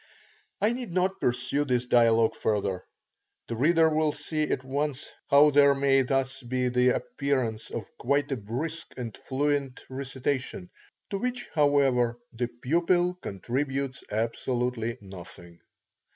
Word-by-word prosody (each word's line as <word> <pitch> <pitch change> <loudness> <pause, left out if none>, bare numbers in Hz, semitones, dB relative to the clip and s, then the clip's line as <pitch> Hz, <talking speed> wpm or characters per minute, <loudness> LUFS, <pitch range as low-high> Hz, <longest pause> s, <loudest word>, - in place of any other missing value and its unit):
I 215 +3 +2
need 245 -6 -5
not 185 +2 0
pursue 125 +4 +1
this 125 -3 0
dialogue 115 -2 +4
further. 100 -4 -1 0.6
The 115 - -3
reader 160 +6 +4
will 155 -1 +1
see 150 +1 -2
at 130 - -1
once 140 +1 -2 0.2
how 145 +1 +7
there 140 0 +6
may 135 -1 +3
thus 135 0 -1
be 125 0 -1
the 125 0 +3
appearance 130 -6 -2
of 110 -4 -5
quite 140 +2 +1
a - - +1
brisk 140 +10 -5
and 115 -4 -5
fluent 140 -1 -1
recitation, 135 +6 -3 0.4
to 195 - -1
which 245 +1 -3
however 135 -5 +3 0.2
the 120 +1 -1
pupil 170 +9 +1
contributes 135 +6 -3
absolutely 115 +1 -1
nothing. 85 -3 -11
135 Hz, 130 wpm, -27 LUFS, 120-145 Hz, 0.6 s, how